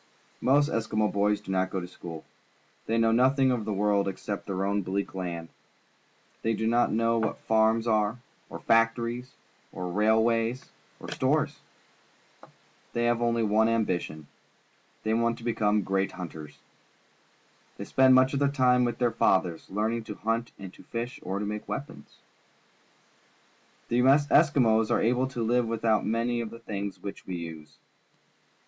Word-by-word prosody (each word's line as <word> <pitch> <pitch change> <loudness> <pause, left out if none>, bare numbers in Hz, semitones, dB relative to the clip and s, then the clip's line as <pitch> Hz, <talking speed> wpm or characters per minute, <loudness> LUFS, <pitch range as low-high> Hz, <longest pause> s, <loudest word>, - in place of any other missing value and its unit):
Most 145 +3 +4
Eskimo 110 -1 0
boys 105 +1 +1
do 95 - -7
not 95 0 +1
go 95 - -3
to 90 - -6
school. 85 -3 -9 0.6
They 115 - +1
know 115 0 +3
nothing 130 +3 +3
of 120 -4 -1
the 110 - -2
world 100 0 +1
except 100 +1 -5
their 95 -1 -2
own 100 +1 0
bleak 100 +2 -3
land. 85 -3 -5 0.9
They 115 0 0
do 110 - -2
not 120 +2 +2
know 115 +1 +1
what 110 - -1
farms 110 +1 +2
are, 110 0 +1 0.3
or - - -7
factories, 115 +2 +1 0.4
or 90 -1 -5
railways, 115 +4 +1 0.3
or - - -8
stores. - - 0 1.3
They 120 - 0
have 120 0 +1
only 115 -1 +1
one 110 +1 +3
ambition. 90 -9 -1 0.8
They 110 - 0
want 115 0 +1
to 120 - -13
become 105 -3 +1
great 95 0 -1
hunters. 80 -5 -8 1.2
They - - -6
spend 130 -1 +5
much 130 +1 +4
of 140 - 0
their 140 - +3
time 125 -3 +3
with 120 - -2
their 120 -2 +1
fathers, 90 -6 +1
learning 110 +3 -1
to 105 - -7
hunt 115 +3 -2
and 95 -1 -9
to - - -15
fish 120 +3 -5
or 95 +2 -3
to 105 - -3
make 105 +1 -5
weapons. 70 - -7 1.7
The 120 - +2
Eskimos 135 -4 +4
are - - +2
able 125 +3 +1
to 120 -3 -3
Uve 120 +1 +2
without 110 -1 +1
many 120 +2 0
of 115 - -5
the 115 - -10
things 100 -3 -6
which 100 - -8
we 95 - -4
use. 80 -3 -8
110 Hz, 160 wpm, -27 LUFS, 100-120 Hz, 1.7 s, spend